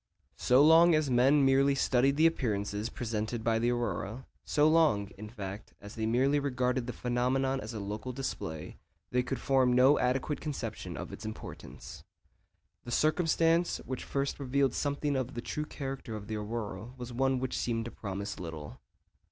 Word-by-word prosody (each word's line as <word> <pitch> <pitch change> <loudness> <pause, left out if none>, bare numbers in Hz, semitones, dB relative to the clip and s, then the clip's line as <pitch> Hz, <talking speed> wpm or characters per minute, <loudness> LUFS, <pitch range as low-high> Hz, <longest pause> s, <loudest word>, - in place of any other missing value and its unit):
So 130 +3 +5
long 165 +2 +7
as 155 -3 +1
men 135 +4 +5
merely 135 +1 +4
studied 135 +1 +2
the 160 - +5
appearances 105 -8 0
presented 110 0 -3
by 115 -1 +2
the 120 +1 +1
aurora, 120 0 -2 0.2
so 150 0 +3
long, 155 -11 +3
in 105 +2 -9
fact, 100 -1 -8
as 105 +1 -10
they 110 -1 -2
merely 135 +5 +3
regarded 125 -3 -1
the - - -2
phenomenon 130 +2 0
as 110 +2 -7
a - - -3
local 105 +5 -5
display, 80 - -5 0.3
they 125 - +2
could 125 +2 -3
form 130 -2 +3
no 130 +4 +5
adequate 130 +4 0
conception 130 -8 -5
of - - -6
its - - -9
importance. 110 0 -9 0.8
The - - -9
circumstance 165 +4 +2
which 130 -1 -4
first 140 +1 -2
revealed 135 -1 +1
something 145 0 -1
of 130 -1 -2
the - - -3
true 150 +5 -4
character 135 -6 -6
of 105 -1 -7
the 110 - -4
aurora 105 +1 -5
was 125 -1 -7
one 135 +1 +1
which 130 0 -3
seemed 115 -2 -1
to 120 - -6
promise 100 -1 -5
little. 80 -4 -8
125 Hz, 170 wpm, -30 LUFS, 110-140 Hz, 0.8 s, long